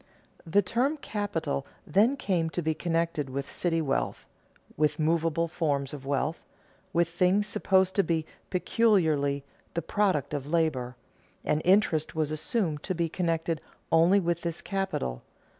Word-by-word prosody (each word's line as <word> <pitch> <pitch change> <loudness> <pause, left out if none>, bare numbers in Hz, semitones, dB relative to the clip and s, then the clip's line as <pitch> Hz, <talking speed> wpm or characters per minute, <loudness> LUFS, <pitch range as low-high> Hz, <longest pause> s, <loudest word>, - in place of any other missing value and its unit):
The 200 +5 +4
term 255 +10 +1
capital 200 - -2 0.2
then 215 - +3
came 175 -9 0
to 175 - +1
be 160 0 +1
connected 165 -3 -1
with 140 +1 -4
city 165 -2 0
wealth, 135 -2 -1 0.5
with 150 0 +1
movable 165 +1 +1
forms 145 -5 -1
of 135 -2 -8
wealth, 145 +3 -1 0.5
with 170 -2 +2
things 180 +4 +2
supposed 190 -2 +2
to 200 - +5
be 165 -3 0 0.2
peculiarly 160 -9 +2 0.3
"the 170 - -1
product 190 -10 +1
of 145 -1 -3
labor"; 150 -6 0 0.5
and 150 - +1
interest 180 -5 +3
was 155 -1 0
assumed 155 -1 -1
to 185 - -3
be 165 -1 0
connected 165 -2 -1 0.3
only 170 +5 +5
with 170 -2 -1
this 170 -1 -3
capital. 190 - -2
165 Hz, 140 wpm, -28 LUFS, 150-185 Hz, 0.5 s, to